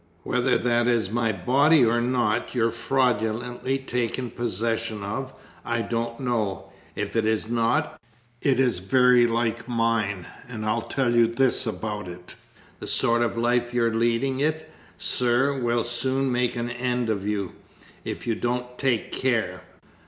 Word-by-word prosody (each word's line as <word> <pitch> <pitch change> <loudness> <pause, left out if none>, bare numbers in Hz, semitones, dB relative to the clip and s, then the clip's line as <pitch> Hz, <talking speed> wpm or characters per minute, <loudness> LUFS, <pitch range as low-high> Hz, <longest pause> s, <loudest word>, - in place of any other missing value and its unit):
Whether 125 0 +1
that 120 0 +1
is 115 -5 +1
my 115 -1 +1
body 135 - +4
or 120 +1 +2
not 120 -1 0
you've 115 -1 +2
fraudulently 125 0 0
taken 125 -2 -2
possession 115 -2 -2
of, 130 +7 -4 0.3
I 115 -1 -1
don't 115 0 -3
know; 105 -7 -2 0.2
if 105 +2 -4
it 115 - +2
is 110 0 0
not, 115 0 0 0.4
it 135 -3 +2
is 125 -8 +2
very 125 +4 +4
like 115 0 -1
mine, 115 -5 0 0.2
and 110 -3 -6
I 110 +2 +1
tell 130 -3 +1
you 120 -1 +5
this 125 +1 +1
about 105 -2 -4
it. 90 0 -9 0.5
The - - -7
sort 120 0 +3
of 115 0 0
life 120 +1 +1
you're 115 -2 +2
leading 120 +4 +1
it, 155 +2 -1 0.3
sir, 125 +3 +2
will 120 -3 0
very 120 +1 -3
soon 130 +2 0
make 125 0 0
an 120 0 -3
end 125 -1 -1
of 100 -1 -3
you, 100 -3 -2 0.5
if - - -5
you 115 - +1
don't 125 +2 -3
take 130 -5 0
care. 110 -8 -1
120 Hz, 155 wpm, -25 LUFS, 110-125 Hz, 0.5 s, you